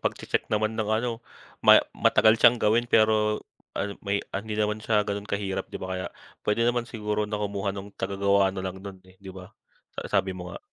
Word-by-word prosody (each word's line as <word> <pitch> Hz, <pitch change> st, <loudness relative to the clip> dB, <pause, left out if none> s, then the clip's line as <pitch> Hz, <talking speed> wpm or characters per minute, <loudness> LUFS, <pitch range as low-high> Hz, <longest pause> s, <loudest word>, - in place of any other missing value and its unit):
pag-che-check -, -, -2 dB
naman 110 Hz, +1 st, 0 dB
ng 110 Hz, -1 st, -2 dB
ano, 115 Hz, +1 st, -1 dB, 0.4 s
ma -, -, +8 dB, 0.2 s
matagal 110 Hz, +1 st, +4 dB
siyang 120 Hz, +1 st, +7 dB
gawin, 115 Hz, +2 st, +2 dB
pero 110 Hz, -1 st, +3 dB, 0.3 s
ano, 100 Hz, -, -2 dB
may 100 Hz, 0 st, -1 dB
an 100 Hz, +3 st, -4 dB
hindi 105 Hz, -, -3 dB
naman 105 Hz, 0 st, 0 dB
siya 105 Hz, -1 st, +1 dB
ganun 100 Hz, +1 st, -4 dB
kahirap, 95 Hz, -1 st, -3 dB
di -, -, -6 dB
ba? 95 Hz, 0 st, -5 dB
Kaya 95 Hz, 0 st, -3 dB, 0.4 s
pwede 115 Hz, +3 st, +2 dB
naman 120 Hz, 0 st, 0 dB
siguro 105 Hz, -2 st, -2 dB
na 105 Hz, -, -2 dB
kumuha 100 Hz, -1 st, -3 dB
nung 100 Hz, +1 st, -8 dB
taga-gawa 100 Hz, 0 st, +1 dB
na 95 Hz, -, -4 dB
lang 95 Hz, 0 st, -5 dB
nun, 95 Hz, -2 st, -10 dB
eh, 95 Hz, +1 st, -21 dB
di 95 Hz, -, -11 dB
ba? 95 Hz, -1 st, -11 dB, 0.5 s
Sa -, -, -7 dB
sabi 95 Hz, 0 st, -1 dB
mo 90 Hz, -1 st, -8 dB
nga. -, -, -7 dB
105 Hz, 205 wpm, -26 LUFS, 95-110 Hz, 0.5 s, ma